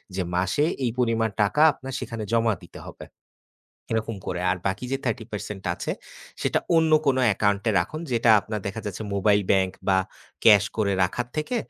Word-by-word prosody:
যে 95 - -1
মাসে 95 +11 +1 0.2
এই 120 - 0
পরিমাণ 115 -2 +1
টাকা 105 +9 +1
আপনার 135 -1 -9
সেখানে 115 -3 -5
জমা 115 -1 +3
দিতে - - -12
হবে। - - -10 0.9
এরকম 110 0 -1
করে। 90 - -2
আর 95 - -1
বাকি 95 +6 -3
যে 135 - +1
30% 105 -4 -4
আছে, - - -4 0.5
সেটা - - +1 0.2
অন্য 160 -1 +3 0.2
কোনো 130 -1 +3 0.2
account-এ 100 +2 +1
রাখুন 155 - -4
যেটা 115 -1 +2
আপনার 110 +1 -5
দেখা 105 +3 -5
যাচ্ছে 105 +1 -5
mobile 100 +1 +3
bank 95 -1 +2
বা 95 -1 +4 0.5
cash 105 -3 +7
করে 100 -2 +1
রাখার 120 +7 -2
থেকে 155 +11 -2
110 Hz, 170 wpm, -25 LUFS, 100-120 Hz, 0.9 s, cash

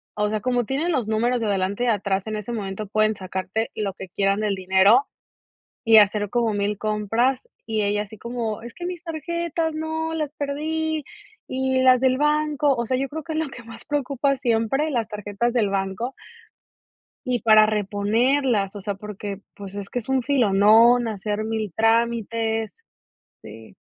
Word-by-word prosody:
o 210 0 0
sea, 215 0 -1
como 245 -1 +1
tienen 295 +8 -1
los 255 -7 -1
números 235 +3 +1
de 225 - -1
adelante 200 +3 -1
y - - 0
atrás 200 -3 0
en 215 0 -3
ese 210 +3 -5
momento 200 -1 -4
pueden 215 +1 +2
sacarte 190 +3 -3
lo 200 -2 -2
que 190 0 -9
quieran 195 +2 +1
del 210 -2 0
dinero, 190 +7 +4 0.8
y 225 -1 +7
hacer 205 0 +2
como 230 -1 +1
1000 205 0 -1
compras, 225 - 0 0.2
y 220 -2 -1
ella 205 +1 0
así 210 +1 -12
como: 235 -2 -4
"Es 235 0 -9
que 350 - -7
mis 355 -1 -5
tarjetas 330 0 -2
¡no! 320 +1 -3
Las 305 -3 -3
perdí. 310 +2 -2 0.4
Y 260 0 0
las 255 -1 +6
del 260 -1 +3
banco". 300 -1 +2
O 235 -1 -2
sea, 255 +2 0
yo 270 +1 -1
creo 315 0 -6
que 325 - -7
es 310 - -1
lo 320 - -1
que 250 -2 -11
más 230 0 -11
preocupa 280 -1 0
siempre, 240 +6 0
las 235 -5 -1
tarjetas 210 +3 -2
del 225 -5 +2
banco 195 +6 -2 1.1
y 250 -2 0
para 215 -1 +7
reponerlas, 215 +2 +1
o - - -6
sea, 200 +1 -3
porque, 205 0 -7
pues, 200 -1 -9
es 200 -1 -6
que 245 - -2
es 225 - -12
un 265 -1 +1
filón 230 -1 +5
hacer 210 0 -3
1000 220 -3 -3
trámites. 225 -1 0 0.7
Sí. - - -12
225 Hz, 180 wpm, -23 LUFS, 205-265 Hz, 1.1 s, y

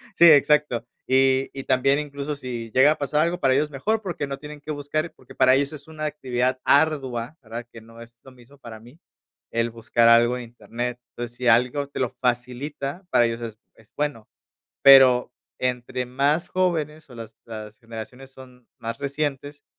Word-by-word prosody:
sí, 170 - +6
exacto, 150 -4 +3 0.2
y 130 0 +3
y 135 - -6
también 135 +2 +2
incluso 145 0 -5
si 120 -4 -6
llega 130 +3 +6
a 155 - -1
pasar 150 +1 0
algo 170 +2 0
para 135 -4 +3
ellos 145 +3 +2
es 150 - -15
mejor 215 +12 -1
porque 175 -8 -4
no 140 0 -5
tienen 150 +1 -10
que 155 +1 -7
buscar, 150 +3 -3
porque 130 - -17
para 130 0 +5
ellos 140 +1 0
es 150 0 -11
una 155 -1 -8
actividad 130 -3 -1
ardua, 140 -3 +1
¿verdad?, 115 +2 -7
que 115 - -11
no 115 +1 -15
es 115 0 -15
lo 130 - -14
mismo 130 +3 -19
para 115 -4 -11
mí, 125 +8 -17 0.5
el 115 0 0
buscar 115 0 +2
algo 120 +1 +5
en 125 - -6
internet, 120 +1 -6
entonces 120 0 -7
si 125 - -2
algo 125 +5 +3
te 140 - -7
lo 125 - +1
facilita, 130 +6 -3
para 120 - +4
ellos 115 0 -2
es 115 -2 -7 0.2
es 110 - -24
bueno 145 -7 -3 0.5
pero 130 -3 +7 0.3
entre 125 0 -2
más 140 +6 0
jóvenes 155 -5 -1
o 125 - -13
las 115 -1 -10
las 110 -2 -8
generaciones 120 +4 -10
son 125 -2 -16
más 115 +1 -5
recientes, 145 0 -4
130 Hz, 190 wpm, -24 LUFS, 120-145 Hz, 0.5 s, pero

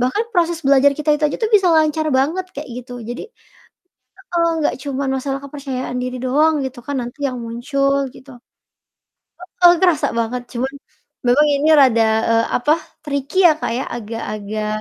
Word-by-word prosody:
bahkan 255 - 0
proses 340 -2 +1
belajar 280 +1 +5
kita 300 0 0
itu 300 - -5
aja - - -4
tuh 445 - +1
bisa 385 -3 +5
lancar 310 0 +2
banget 325 +8 0
kayak 290 -1 -6
gitu. 250 0 -9 0.2
Jadi 240 +2 -5 1.1
heeh, 335 -1 +2
gak - - +1
cuman 275 -1 -3
masalah 270 +1 -3
kepercayaan 265 -3 -5
diri 255 0 -4
doang 300 +5 +3
gitu 265 -1 -6
kan 285 - -3
nanti 240 +4 -7
yang 255 - -5
muncul 275 +4 0 0.2
gitu. 275 - -15 1.3
Heeh, 350 -1 +8
kerasa 355 -4 +3
banget 240 +2 -2
cuman 260 +3 -2 0.6
memang 290 +5 +4
ini 290 +3 +1
rada, 245 -5 +5 0.3
eee, 230 0 +3
apa, 295 +5 +2 0.3
tricky 280 +3 -4
ya 325 - +6
Kak - - -2
ya, 265 - -2
agak-agak 215 -1 -5
275 Hz, 160 wpm, -19 LUFS, 245-305 Hz, 1.3 s, Heeh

